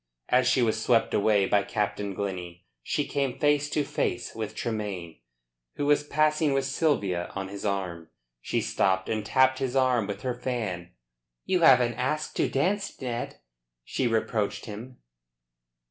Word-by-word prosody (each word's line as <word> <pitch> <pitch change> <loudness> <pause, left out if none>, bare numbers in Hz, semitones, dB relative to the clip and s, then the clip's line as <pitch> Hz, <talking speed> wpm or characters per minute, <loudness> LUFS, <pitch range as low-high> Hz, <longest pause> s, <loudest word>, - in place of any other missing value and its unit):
As 125 0 +4
she 130 -1 +3
was 110 -1 +1
swept 115 -2 +3
away 105 -1 +3
by 100 +1 +3
Captain 100 -1 -2
Glennie, 90 -3 -5 0.2
she - - -1
came 135 -3 -1
face 145 0 +2
to 150 - +1
face 120 -3 -2
with 110 -2 -5
Tremayne, 100 - -4 0.6
who 145 - -2
was 145 0 +4
passing 155 0 +2
with 135 0 +1
Sylvia 105 - 0
on 95 -1 -4
his 100 +1 -7
arm. 90 -5 -3 0.3
She - - -1
stopped 95 -1 +1
and 110 -1 -1
tapped 130 +4 +3
his 135 -1 -2
arm 125 -5 +3
with 100 - -5
her 125 -1 -1
fan. 110 -9 -4 0.5
"You 185 -1 +2
haven't 125 -6 +5
asked 150 +4 -1
to - - +2
dance, 195 +9 -1
Ned," 120 -2 -4 0.4
she 125 - -1
reproached 110 -2 -1
him. 115 +4 -8
120 Hz, 155 wpm, -27 LUFS, 100-135 Hz, 0.6 s, haven't